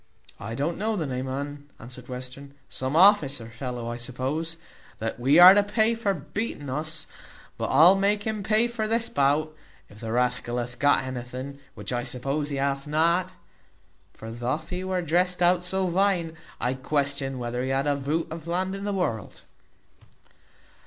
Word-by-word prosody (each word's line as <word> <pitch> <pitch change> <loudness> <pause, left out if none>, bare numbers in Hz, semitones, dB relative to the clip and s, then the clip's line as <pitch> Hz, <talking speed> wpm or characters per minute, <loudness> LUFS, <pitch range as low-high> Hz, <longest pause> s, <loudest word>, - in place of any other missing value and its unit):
"I 115 +2 -5
don't 155 +7 -2
know 220 +2 0
the 170 -6 -2
name 130 -1 -3
o' 130 - -3
un," 145 0 -7
answered 125 +1 -10
Western; 130 +2 -7
"some 130 +3 -3
officer 145 - +4
fellow, 120 0 -5
I 120 0 -4
suppose, 135 +7 -2 0.4
that 110 +1 -4
we 135 +5 +4
are 180 +2 +11
to 205 - +5
pay 220 +3 +1
for 215 -4 -1
beating 150 - -5
us; 155 +3 -3 0.5
but - - -3
I'll 170 +4 +7
make 200 +1 +1
him 220 -1 -2
pay 215 +3 +2
this 230 -1 -1
bout, 145 +3 +1 0.4
if 105 - -14
the 110 -1 -5
rascal 125 0 0
hath 120 0 -4
got 145 -1 +4
anything, 130 +2 -6 0.2
which - - -4
I 120 - 0
suppose 135 +4 -2
he 140 - -3
hath 140 +1 -1
not. 165 +4 +1 0.8
For 110 0 -9
thof 130 +8 -3
he 180 +1 -3
was 185 -2 -2
drest 180 +3 +1
out 175 0 +3
so 190 +1 0
vine, 180 -2 +1 0.2
I 125 - 0
question 140 0 0
whether 120 0 -3
he 130 - -2
had 135 +1 +1
got 145 - +2
a - - -1
voot 150 +5 -2
of 165 0 -7
land 185 +2 -1
in 195 +1 -5
the 205 - -1
world." 145 - -3
145 Hz, 180 wpm, -26 LUFS, 130-180 Hz, 0.8 s, are